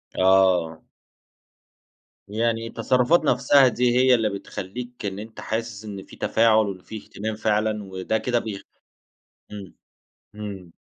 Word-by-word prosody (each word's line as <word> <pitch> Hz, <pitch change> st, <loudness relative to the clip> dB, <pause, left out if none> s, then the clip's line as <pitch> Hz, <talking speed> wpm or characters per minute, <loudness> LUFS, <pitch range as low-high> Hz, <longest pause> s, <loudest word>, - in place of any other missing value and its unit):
آه. 95 Hz, -4 st, +3 dB, 1.5 s
يعني 115 Hz, +2 st, -1 dB
التصرفات 125 Hz, +8 st, +2 dB
نفْسها 140 Hz, -2 st, +4 dB
دي، 125 Hz, 0 st, +1 dB
هي 130 Hz, 0 st, +5 dB
اللي 110 Hz, -2 st, +1 dB
بتخلّيك 105 Hz, +4 st, -7 dB
إن 100 Hz, 0 st, -4 dB
أنت 110 Hz, +1 st, -10 dB
حاسس 110 Hz, -1 st, -4 dB
إن 100 Hz, -2 st, -7 dB
في -, -, -15 dB
تفاعل 110 Hz, -1 st, +3 dB
وإن 95 Hz, -2 st, -5 dB
في 110 Hz, -, -8 dB
اهتمام 110 Hz, +1 st, -6 dB
فعلًا، 105 Hz, 0 st, 0 dB
وده 95 Hz, +2 st, -2 dB
كده 120 Hz, +2 st, 0 dB
بيخ 105 Hz, -4 st, -6 dB, 0.9 s
إمم، 100 Hz, -3 st, -9 dB, 0.6 s
إمم. 100 Hz, -5 st, -8 dB
110 Hz, 125 wpm, -24 LUFS, 100-115 Hz, 1.5 s, هي